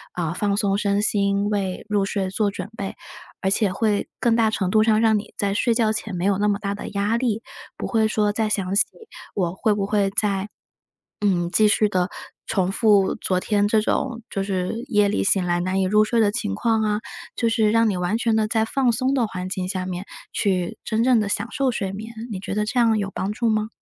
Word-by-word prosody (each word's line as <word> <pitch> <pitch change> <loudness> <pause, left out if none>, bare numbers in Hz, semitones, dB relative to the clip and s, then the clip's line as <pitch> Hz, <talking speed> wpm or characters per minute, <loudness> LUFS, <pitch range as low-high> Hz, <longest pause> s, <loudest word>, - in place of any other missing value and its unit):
呃， 170 -2 -2
放 200 +2 0
松 200 -1 +1
身 200 -1 +1
心， 200 -1 +1
为 195 -3 -2
入 205 -2 +1
睡 195 -1 -2
做 205 +2 0
准 200 - -6
备。 195 -1 -4 0.5
而 190 - 0
且 200 -1 +2
会 205 +1 0
更 235 -2 +2
大 225 -1 +3
程 190 -4 -1
度 215 - +4
上 215 -1 +3
让 220 -1 +4
你 205 - -11
在 200 -1 0
睡 230 +4 +2
觉 220 -2 +2
前 215 -2 -4
没 175 +1 -2
有 200 -1 +2
那 210 - +2
么 205 -1 +2
大 200 -1 -2
的 200 - -6
压 205 +3 0
力， 235 -3 -1 0.3
不 - - -4
会 220 -2 +2
说 210 -1 +1
再 215 +1 0
想 195 -3 -1
起， 205 - +6 0.5
我 175 -4 0
会 210 +2 +1
不 200 -1 -1
会 200 -1 +1
在， 200 -1 -1 0.8
嗯， 175 -4 +1
继 215 0 +5
续 215 0 +3
地 185 -3 0 0.4
重 190 -3 0
复 205 -3 +3
昨 185 - -1
天， 205 +2 +1
这 220 +1 +3
种 235 +1 -1
就 195 - -2
是， 190 -2 -2 0.2
夜 210 -3 +3
里 205 - 0
醒 195 -1 +2
来 175 0 0
难 185 +2 0
以 - - +2
入 210 +3 +4
睡 225 +2 +1
的 210 -2 +3
情 100 - -2
况 225 - +1
啊， 210 -1 +1 0.4
就 230 - +1
是 220 -2 +2
让 230 +1 +3
你 195 - -2
完 180 +4 0
全 230 -1 +1
的 220 -1 +1
在 220 0 +1
放 255 +2 +1
松 255 +3 0
的 255 -4 +2
环 185 -3 -5
境 185 -1 -3
下 185 -1 -2
面 185 +1 -5 0.3
去， 185 -4 -1
真 225 +1 0
正 250 -3 +4
的 210 - -1
享 200 +2 -1
受 270 -2 +1
睡 195 -5 -3
眠， 220 +4 -7 0.2
你 190 - -4
觉 195 - -4
得 210 0 0
这 245 +4 0
样 225 -2 +4
有 200 -1 -2
帮 190 - -2
助 230 +2 0
吗？ 215 0 0
205 Hz, 250 characters per minute, -23 LUFS, 195-220 Hz, 0.8 s, 起